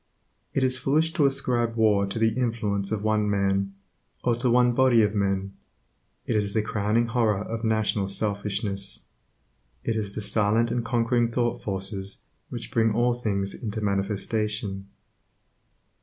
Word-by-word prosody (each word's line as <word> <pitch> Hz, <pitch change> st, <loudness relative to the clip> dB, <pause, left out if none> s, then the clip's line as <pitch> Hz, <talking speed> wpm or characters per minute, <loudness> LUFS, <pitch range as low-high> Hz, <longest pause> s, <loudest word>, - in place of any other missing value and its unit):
It 135 Hz, -, +2 dB
is 130 Hz, 0 st, +1 dB
foolish 155 Hz, +5 st, +1 dB
to 150 Hz, -6 st, +4 dB
ascribe 125 Hz, -4 st, 0 dB
war 105 Hz, -3 st, +3 dB
to 100 Hz, -, -4 dB
the 110 Hz, 0 st, +3 dB
influence 110 Hz, -5 st, -1 dB
of 105 Hz, -1 st, -2 dB
one 110 Hz, -1 st, +1 dB
man, 100 Hz, -1 st, 0 dB, 0.5 s
or 120 Hz, -, +2 dB
to 125 Hz, +1 st, 0 dB
one 125 Hz, +1 st, +4 dB
body 120 Hz, -2 st, +4 dB
of 105 Hz, 0 st, +1 dB
men. 100 Hz, -1 st, -1 dB, 0.7 s
It 115 Hz, -, -1 dB
is 105 Hz, -1 st, 0 dB
the 110 Hz, -, +2 dB
crowning 110 Hz, +1 st, +1 dB
horror 115 Hz, -3 st, +1 dB
of 115 Hz, +2 st, -5 dB
national 110 Hz, -3 st, +1 dB
selfishness. 100 Hz, -1 st, -2 dB, 0.8 s
It 115 Hz, -, -1 dB
is 105 Hz, -3 st, -3 dB
the -, -, -4 dB
silent 110 Hz, +2 st, +2 dB
and 120 Hz, -, -1 dB
conquering 120 Hz, 0 st, +1 dB
thought 120 Hz, 0 st, 0 dB
forces 95 Hz, 0 st, -4 dB, 0.3 s
which -, -, -6 dB
bring 110 Hz, -1 st, +2 dB
all 120 Hz, +1 st, +3 dB
things 100 Hz, -5 st, -2 dB
into 110 Hz, -2 st, -5 dB
manifestation. 100 Hz, 0 st, -2 dB
110 Hz, 150 wpm, -26 LUFS, 100-120 Hz, 0.8 s, to